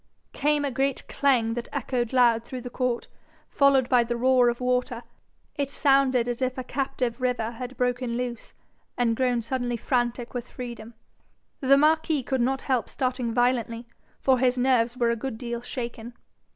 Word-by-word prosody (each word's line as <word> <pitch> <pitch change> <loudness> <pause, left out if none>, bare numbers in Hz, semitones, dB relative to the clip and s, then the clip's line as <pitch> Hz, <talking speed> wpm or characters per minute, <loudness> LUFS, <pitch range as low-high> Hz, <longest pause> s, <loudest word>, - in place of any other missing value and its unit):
Came 295 0 +1
a 280 - -1
great 270 +1 -1
clang 250 -5 +2
that 240 0 -5
echoed 240 -3 -2
loud 240 -3 +4
through 255 +1 -7
the 245 0 -8
court, 250 -2 -1 0.4
followed 275 -3 +3
by 250 -2 +4
the 240 0 -3
roar 250 0 +4
of 235 - -3
water. 250 -1 -1 0.5
It 280 -2 -1
sounded 270 -4 +3
as 245 +1 -3
if 255 0 -1
a 255 - -3
captive 255 -2 -2
river 245 -3 0
had 250 +2 -7
broken 245 -1 -1
loose, 245 -2 -5 0.4
and 235 -2 +2
grown 245 -1 +1
suddenly 245 0 -2
frantic 240 0 -1
with 245 -1 -5
freedom. 235 -2 -8 0.6
The 275 0 +5
marquis 310 -1 +2
could 260 0 -1
not 265 +2 0
help 255 -4 0
starting 255 -2 -2
violently, 240 -1 0 0.3
for 260 -2 +3
his 255 0 +2
nerves 245 -1 +2
were 235 -2 +2
a - - 0
good 230 0 -5
deal 235 0 -4
shaken. 240 -1 -6
250 Hz, 170 wpm, -26 LUFS, 235-260 Hz, 0.6 s, The